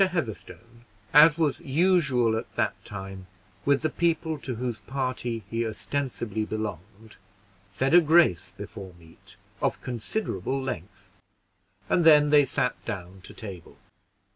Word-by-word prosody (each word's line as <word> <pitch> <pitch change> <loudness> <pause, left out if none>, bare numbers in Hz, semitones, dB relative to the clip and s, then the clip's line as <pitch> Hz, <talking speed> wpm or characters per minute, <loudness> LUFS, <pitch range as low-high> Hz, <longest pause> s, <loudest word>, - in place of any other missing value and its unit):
Heatherstone, 120 - -5 0.3
as 150 +2 +8
was 155 -4 +1
usual 140 -7 +2
at 110 - -6
that - - +1
time 95 -1 -8 0.4
with 140 0 +2
the 155 - +2
people 160 -2 0
to 130 -2 -5
whose 120 -1 -3
party 125 -1 -3
he 115 +3 -2
ostensibly 115 -1 -3
belonged, 105 0 -6 0.5
said 135 +9 0
a 175 - +9
grace 160 - +3
before 95 -5 -9
meat, 80 -1 -17 0.3
of - - 0
considerable 125 - -3
length, 100 -5 -7 0.7
and 175 - +2
then 150 -2 +6
they 145 -1 +6
sat 125 -1 -2
down 95 -1 -7
to - - -11
table. 95 -6 -9
120 Hz, 130 wpm, -26 LUFS, 105-150 Hz, 0.7 s, a